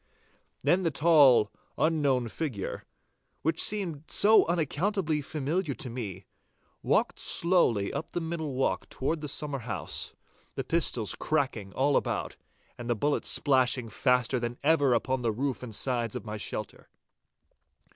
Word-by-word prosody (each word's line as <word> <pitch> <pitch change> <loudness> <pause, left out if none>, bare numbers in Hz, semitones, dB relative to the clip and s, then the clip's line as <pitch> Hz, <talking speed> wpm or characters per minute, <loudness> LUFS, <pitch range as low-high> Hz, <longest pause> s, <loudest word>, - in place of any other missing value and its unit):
Then 180 +2 +3
the 170 - +1
tall, 140 -8 +5 0.3
unknown 145 -6 +1
figure, 125 - -4 0.6
which 160 +1 +1
seemed 175 -8 +1
yet 215 +2 +5
unaccountably 165 0 0
familiar 150 +2 -2
to 130 -6 -4
me, 100 -7 -6 0.6
walked - - +1
slowly 145 - +2
up 155 - -4
the - - -3
middle 160 -4 -4
walk 130 - -1
toward 155 +4 -2
the 150 - -4
summer 145 0 -2
house, 110 - -3 0.4
the 135 - -2
pistols 125 -7 +1
cracking 130 -10 -2
all 140 +1 +2
about, - - -1 0.4
and 120 0 -6
the 120 - +2
bullets 145 +7 0
splashing 130 -4 +2
faster 125 +2 +1
than 120 0 -4
ever 145 -4 +4
upon 130 +3 -1
the 115 -2 +1
roof 130 +4 -2
and 115 -4 -5
sides 120 -3 -1
of 120 -4 -5
my 105 0 -5
shelter. 105 0 -6
135 Hz, 140 wpm, -28 LUFS, 120-160 Hz, 0.6 s, tall